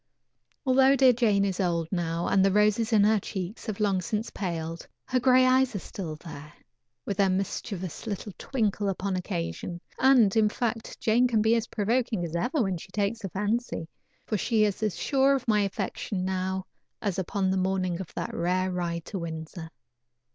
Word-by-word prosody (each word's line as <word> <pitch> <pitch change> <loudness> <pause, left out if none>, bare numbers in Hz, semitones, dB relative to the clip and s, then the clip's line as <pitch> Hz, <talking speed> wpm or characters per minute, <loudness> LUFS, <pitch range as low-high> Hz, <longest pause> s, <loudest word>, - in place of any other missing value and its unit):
Although 265 +1 +5
dear 260 -1 +6
Jane 215 -4 +2
is 190 -2 -2
old 170 -3 0
now, 170 -2 -1
and 195 -1 +4
the 195 - +4
roses 210 +3 +3
on 210 -3 +5
her 215 +1 +4
cheeks 195 +3 -6
have 215 -2 -3
long 200 -3 +2
since 210 +5 -3
paled, 165 -3 -4 0.2
her 255 - +1
gray 255 0 +5
eyes 255 -2 +3
are - - +1
still 175 -4 -6
there, 150 -2 -10 0.5
with 200 - -3
their 200 -2 +4
mischievous 185 0 -3
little 205 -1 -4
twinkle 210 -5 -1
upon 195 0 -2
occasion, 170 - -4 0.2
and 250 -7 +5
in 215 -1 +4
fact, 225 0 -3
Jane 235 +3 +3
can 220 -3 +2
be 220 +1 +4
as 230 0 -1
provoking 225 -2 0
as 165 0 -5
ever 245 - +1
when 190 -3 -1
she 180 - -12
takes 205 +3 -1
the 195 -4 -5
fancy, 210 -2 -2 0.4
for 215 - -1
she 220 +1 +2
is 205 -1 0
as 215 -4 -1
sure 275 0 +3
of 260 -2 -4
my 210 -2 +3
affection 195 -1 -3
now 190 0 -2 0.3
as 200 -3 -2
upon 190 +1 0
the 190 - +1
morning 185 -1 0
of 185 - -8
that - - -4
rare 185 +2 0
ride 170 -2 -3
to 195 - -5
Windsor. 160 0 -6
200 Hz, 185 wpm, -27 LUFS, 180-225 Hz, 0.5 s, dear